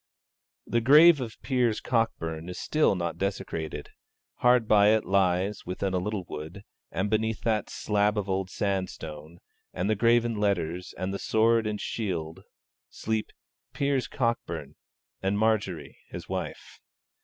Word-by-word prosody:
The 120 - 0
grave 150 +5 +7
of 115 -3 -6
Piers 125 -5 +1
Cockburn 85 -9 -1
is 90 - -6
still 155 -9 +2
not 85 -2 -3
desecrated: 95 - -4 0.5
hard 125 -3 +4
by 105 -1 +6
it 110 - -1
lies, 95 +1 +1
within 95 +1 -3
a 90 - +1
little 100 0 -3
wood; 80 +7 -7 0.3
and 95 +3 -1
beneath 110 +1 0
that 110 -2 0
slab 105 0 0
of 100 -2 -1
old 95 -1 -1
sandstone, 85 -6 -4 0.4
and 90 - -1
the - - +2
graven 115 +1 +3
letters, 90 -4 -1
and 95 +1 -3
the 100 - -3
sword 115 0 +2
and 105 -1 -3
shield, 85 -9 -3 0.5
sleep 110 -1 -2 0.4
'Piers 140 -3 0
Cockburn 115 -2 -2 0.5
and 95 +1 0
Marjory 105 -7 0
his - - -8
wife.' - - -6
105 Hz, 140 wpm, -27 LUFS, 90-115 Hz, 0.5 s, grave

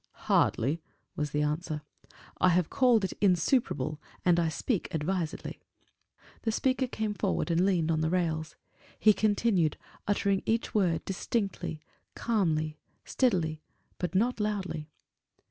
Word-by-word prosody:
"Hardly," 145 +8 +2 0.3
was 150 0 -1
the 150 +1 0
answer: 150 0 -2 0.6
"I 185 - +5
have 175 -2 +2
called 245 -5 +4
it - - -3
insuperable, 170 - +2 0.2
and 175 -1 +5
I 165 -1 +2
speak 200 +5 -2
advisedly." 160 +1 -3 0.8
The 225 - 0
speaker 260 +3 +1
came 220 -3 -2
forward 175 -2 -1
and 170 +2 +3
leaned 170 -4 +2
on 155 -1 +1
the 160 - +1
rails. 160 -3 -1 0.4
He 215 - +6
continued, 205 -6 +2 0.3
uttering 200 -1 +2
each 225 +1 0
word 175 -6 +1
distinctly, 195 -5 -2 0.3
calmly, 155 -9 0 0.3
steadily, 170 -11 +1 0.4
but 180 0 -3
not 235 +5 +2
loudly. 195 -7 -2
180 Hz, 130 wpm, -29 LUFS, 155-210 Hz, 0.8 s, He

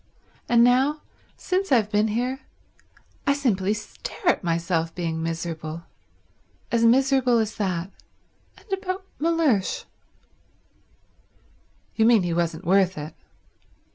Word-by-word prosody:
And 235 -1 +5
now, 265 +5 +3 0.4
since 380 -1 -2
I've 220 -5 +3
been 210 0 +2
here, 245 +5 -2 0.9
I 280 - +5
simply 215 -8 0
stare 280 - -4
at - - +1
myself 165 -1 -1
being 165 -2 -3
miserable. 165 -1 -4 0.9
As 235 -1 +2
miserable 260 0 +4
as 220 -1 -1
that. 185 -2 -2 0.7
And - - -19
about 380 0 -3
Mellersh." 310 - +1 2.1
"You 220 - +3
mean 225 -4 +5
he 175 -1 -1
wasn't 170 +1 -2
worth 190 0 +3
it." 150 +1 -6
215 Hz, 110 wpm, -24 LUFS, 170-265 Hz, 2.1 s, And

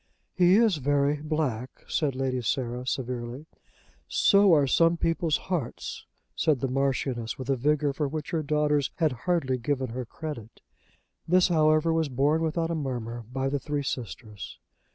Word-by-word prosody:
"He 180 0 +5
is 220 -5 +4
very 145 +1 +1
black," 145 -6 -3
said 145 -4 0
Lady 130 -1 -1
Sarah 125 0 -2
severely. 125 +2 -4 0.6
"So 200 -1 +4
are 150 -4 +5
some 165 +5 +3
people's 165 -2 +1
hearts," 175 -10 -4 0.3
said 155 -5 +2
the 135 - -1
Marchioness 130 -3 -1
with 130 +1 -3
a - - +3
vigour 145 +2 +1
for 145 +1 -1
which 150 +1 -5
her 165 - 0
daughters 150 -2 +1
had 160 -3 +1
hardly 130 0 -1
given 130 +1 -1
her 125 +2 -5
credit. 120 -4 -8 0.7
This, 180 +2 +4
however, 155 0 +3
was 160 -2 +1
borne 145 +5 +2
without 165 +1 -1
a - - 0
murmur 120 -6 -4
by 135 +1 -1
the 140 +1 -1
three 145 +1 -3
sisters. 110 -5 -6
145 Hz, 155 wpm, -27 LUFS, 130-160 Hz, 0.7 s, He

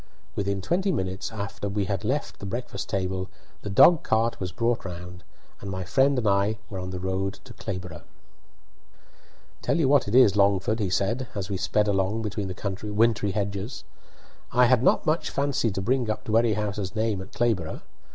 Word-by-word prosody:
Within 100 -1 -1
twenty 190 - +1
minutes 95 - -2
after 100 -1 -4
we 100 0 -1
had 100 -2 -2
left 140 +3 -2
the - - -7
breakfast 110 -2 -5
table 95 -1 -2 0.3
the 105 - -5
dog 165 - +7
cart 115 -5 +1
was 90 -2 -3
brought 115 +3 0
round, 90 0 -8 0.4
and 100 - -7
my 95 -1 -3
friend 135 +9 +3
and 115 -4 0
I 100 +2 +2
were 95 - -4
on 90 0 -5
the 95 - -4
road 95 +1 -2
to - - -12
Clayborough. 90 -4 -6 1.6
"Tell - - +1
you 160 -5 +3
what 140 -3 +4
it 105 - 0
is, 125 -6 +7
Langford," 100 +2 +2
he 100 -3 0
said, 115 +8 0
as 100 -1 -4
we 95 - -1
sped 105 +3 +1
along 100 +2 +1
between 105 -2 -3
the 100 +2 -4
wintry 110 -2 +3
hedges," 100 +3 -3 0.7
I 125 +1 +5
do 120 - -4
not - - +3
much 160 +1 +1
fancy 140 -4 0
to 95 -1 -3
bring 125 +1 +1
up 110 - -2
Dwerrihouse's 105 -3 0
name 110 -3 0
at 95 - -10
Clayborough. 110 -10 -1
100 Hz, 180 wpm, -26 LUFS, 95-115 Hz, 1.6 s, dog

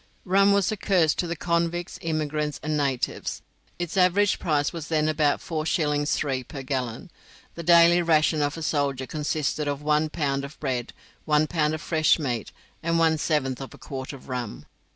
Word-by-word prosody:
Rum 195 +2 +4
was 200 0 +2
a 215 - -3
curse 180 -6 +3
to 175 - -2
the 170 - -3
convicts, 170 +1 -1
immigrants, 150 -2 -2
and 155 0 -1
natives. 140 -4 -2 0.3
Its 175 0 -4
average 195 +2 +3
price 150 -4 0
was 165 -2 -6
then 155 -1 +1
about 150 -2 +1
4s. 155 -2 0
3d. 135 -4 -1
per 135 -3 -7
gallon. 130 - -4 0.4
The 170 - -7
daily 170 +1 +6
ration 155 -2 +3
of 145 +2 -1
a 165 - -5
soldier 140 -4 0
consisted 150 0 -2
of 145 0 -3
one 150 +1 +2
pound 140 -3 -1
of 140 +2 -9
bread, 125 -4 -3 0.3
one 150 0 +3
pound 155 -1 0
of 155 - -7
fresh 155 -2 +3
meat, 125 -8 -3 0.3
and 165 0 0
one 160 -1 +3
seventh 135 -5 0
of 135 -4 -8
a - - -15
quart 130 -1 -6
of 135 -3 -12
rum. 125 -4 -5
155 Hz, 180 wpm, -25 LUFS, 145-165 Hz, 0.4 s, daily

